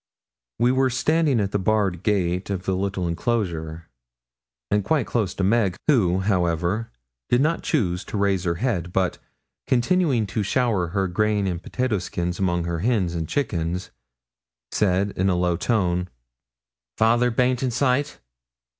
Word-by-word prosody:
We 120 Hz, +2 st, +3 dB
were 130 Hz, 0 st, +2 dB
standing 145 Hz, +1 st, +2 dB
at 100 Hz, -2 st, -1 dB
the 105 Hz, -, 0 dB
barred 95 Hz, -3 st, +1 dB
gate 95 Hz, -3 st, 0 dB
of 95 Hz, -2 st, -3 dB
the 95 Hz, -, 0 dB
little 95 Hz, -1 st, -2 dB
enclosure, 85 Hz, -4 st, -2 dB, 0.8 s
and 105 Hz, -1 st, +2 dB
quite 150 Hz, +4 st, +1 dB
close 105 Hz, -6 st, -1 dB
to 95 Hz, -, -2 dB
Meg, 100 Hz, -2 st, +2 dB
who, 95 Hz, -, +3 dB
however, 90 Hz, +2 st, 0 dB, 0.4 s
did 120 Hz, -, +3 dB
not 155 Hz, +4 st, +1 dB
choose 95 Hz, -, 0 dB
to -, -, -4 dB
raise 100 Hz, -2 st, +1 dB
her 85 Hz, -1 st, 0 dB
head, 90 Hz, -5 st, -2 dB
but, 95 Hz, -2 st, 0 dB, 0.5 s
continuing 130 Hz, -, +2 dB
to 105 Hz, +2 st, -2 dB
shower 105 Hz, -4 st, +1 dB
her 95 Hz, +2 st, -1 dB
grain 105 Hz, +2 st, +1 dB
and 90 Hz, -3 st, -2 dB
potato 125 Hz, -3 st, -1 dB
skins 90 Hz, -1 st, -3 dB
among 85 Hz, -3 st, +1 dB
her 85 Hz, -1 st, -2 dB
hens 100 Hz, -4 st, +1 dB
and 80 Hz, -2 st, -3 dB
chickens, 90 Hz, -9 st, -2 dB, 0.8 s
said 100 Hz, 0 st, +1 dB
in 95 Hz, +1 st, +1 dB
a 90 Hz, -, +2 dB
low 90 Hz, -1 st, +1 dB
tone 90 Hz, -3 st, 0 dB, 0.9 s
'Father 120 Hz, +2 st, +3 dB
baint 125 Hz, +1 st, +1 dB
in 130 Hz, -, +1 dB
sight? 135 Hz, +3 st, 0 dB
100 Hz, 155 wpm, -23 LUFS, 90-120 Hz, 0.9 s, We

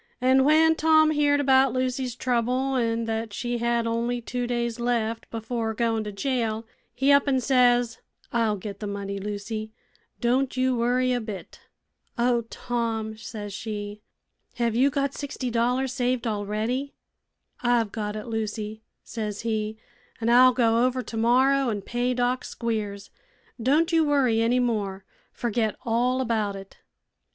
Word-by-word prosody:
An' 260 Hz, +1 st, +4 dB
when 320 Hz, +2 st, +5 dB
Tom 315 Hz, -1 st, +4 dB
heerd 290 Hz, -1 st, +3 dB
about 265 Hz, -2 st, +4 dB
Lucy's 255 Hz, -1 st, -1 dB
trouble, 250 Hz, +2 st, 0 dB
an' 230 Hz, -2 st, 0 dB
thet 225 Hz, -1 st, -3 dB
she 240 Hz, +2 st, -2 dB
had 235 Hz, 0 st, +1 dB
only 235 Hz, +1 st, -1 dB
two 245 Hz, +1 st, -3 dB
days 235 Hz, -1 st, -2 dB
left 230 Hz, -2 st, -1 dB
before 225 Hz, 0 st, -3 dB
goin' 225 Hz, -1 st, 0 dB
to 210 Hz, -, -4 dB
jail, 225 Hz, 0 st, -1 dB, 0.3 s
he 270 Hz, +3 st, +3 dB
up 280 Hz, 0 st, +5 dB
an' 265 Hz, -2 st, +3 dB
says: 245 Hz, -2 st, +3 dB, 0.3 s
'I'll 225 Hz, -3 st, +2 dB
get 200 Hz, 0 st, -7 dB
the 210 Hz, -, -4 dB
money, 200 Hz, 0 st, -4 dB
Lucy: 210 Hz, +2 st, -5 dB, 0.5 s
don' 255 Hz, +3 st, +2 dB
you 255 Hz, 0 st, +1 dB
worry 250 Hz, +2 st, +1 dB
a 245 Hz, -, 0 dB
bit.' 215 Hz, -4 st, -8 dB, 0.6 s
'Oh, 240 Hz, -1 st, +2 dB
Tom!' 225 Hz, -2 st, -3 dB
says 215 Hz, -2 st, -7 dB
she, 210 Hz, 0 st, -5 dB, 0.5 s
'hev 235 Hz, -2 st, 0 dB
you 260 Hz, +4 st, +4 dB
got 280 Hz, 0 st, -1 dB
sixty 270 Hz, -3 st, -4 dB
dollars 250 Hz, +3 st, +1 dB
saved 250 Hz, -2 st, 0 dB
already?' 220 Hz, +6 st, -2 dB, 0.7 s
'I've 240 Hz, -3 st, +2 dB
got 210 Hz, -1 st, -4 dB
it, 215 Hz, -, -5 dB
Lucy,' 220 Hz, -1 st, -4 dB, 0.2 s
says 210 Hz, -3 st, -5 dB
he, 220 Hz, -1 st, -2 dB, 0.4 s
'an' 230 Hz, 0 st, 0 dB
I'll 255 Hz, +2 st, +7 dB
go 235 Hz, -1 st, +3 dB
over 255 Hz, 0 st, 0 dB
tomorrow 255 Hz, +4 st, +2 dB
an' 205 Hz, -3 st, -3 dB
pay 245 Hz, +3 st, -1 dB
Doc 250 Hz, +1 st, 0 dB
Squiers. 210 Hz, -4 st, -4 dB, 0.5 s
Don' 285 Hz, +8 st, +3 dB
you 325 Hz, -1 st, +4 dB
worry 270 Hz, -7 st, +2 dB
any 240 Hz, +2 st, +2 dB
more. 205 Hz, -6 st, -1 dB, 0.3 s
Forget 225 Hz, -2 st, -1 dB
all 250 Hz, +3 st, +1 dB
about 220 Hz, -5 st, -1 dB
it.' 195 Hz, 0 st, -11 dB
235 Hz, 150 wpm, -25 LUFS, 220-255 Hz, 0.7 s, I'll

